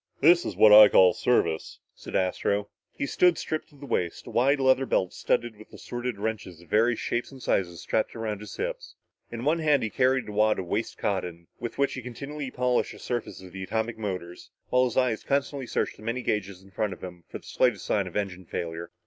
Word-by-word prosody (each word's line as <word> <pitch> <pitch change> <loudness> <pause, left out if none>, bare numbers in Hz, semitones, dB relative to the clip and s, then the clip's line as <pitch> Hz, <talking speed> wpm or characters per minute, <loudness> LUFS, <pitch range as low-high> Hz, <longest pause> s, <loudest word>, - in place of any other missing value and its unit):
"This 170 +4 +5
is - - -4
what 105 -1 +7
I 105 0 +11
call 90 -1 +6
service," 80 - 0 0.2
said - - -9
Astro. 100 +2 0 0.2
He - - -3
stood 175 +4 +3
stripped 155 - -4
to 150 - -21
the 140 0 -11
waist, 90 -10 -2
a - - -9
wide 135 +4 +3
leather 130 0 +3
belt 95 - 0
studded 120 -2 -1
with 110 - -15
assorted 120 -2 -5
wrenches 100 -5 -4
of 85 - -18
various 115 +3 +3
shapes 120 +3 -2
and 135 - -11
sizes 85 -8 -1
strapped 110 - -1
around 110 -3 -3
his 105 - -9
hips. - - -5 0.4
In 120 +2 -5
one 160 +3 +2
hand 150 -4 +3
he 110 - -2
carried 130 0 +2
a - - -6
wad 105 +1 +2
of 95 - -3
waste 105 +6 -3
cotton 90 -4 -3
with 120 0 -5
which 140 0 +1
he 130 - -5
continually 140 +4 -6
polished 125 -1 0
the - - -12
surfaces 120 -5 -4
of 90 - -11
the 95 - -7
atomic 110 +3 -2
motors, 90 -4 -5 0.2
while 125 0 +4
his 125 - -3
eyes 125 -4 +1
constantly 140 -1 -1
searched - - -2
the - - -15
many 115 +3 -3
gauges 100 -3 -2
in 95 - -18
front 105 +1 -1
of - - -13
him 90 -2 -9
for - - -6
the - - -19
slightest 125 -6 +1
sign 100 -3 0
of 90 - -10
engine 95 -3 -3
failure. 85 0 -5
110 Hz, 225 wpm, -27 LUFS, 95-130 Hz, 0.4 s, I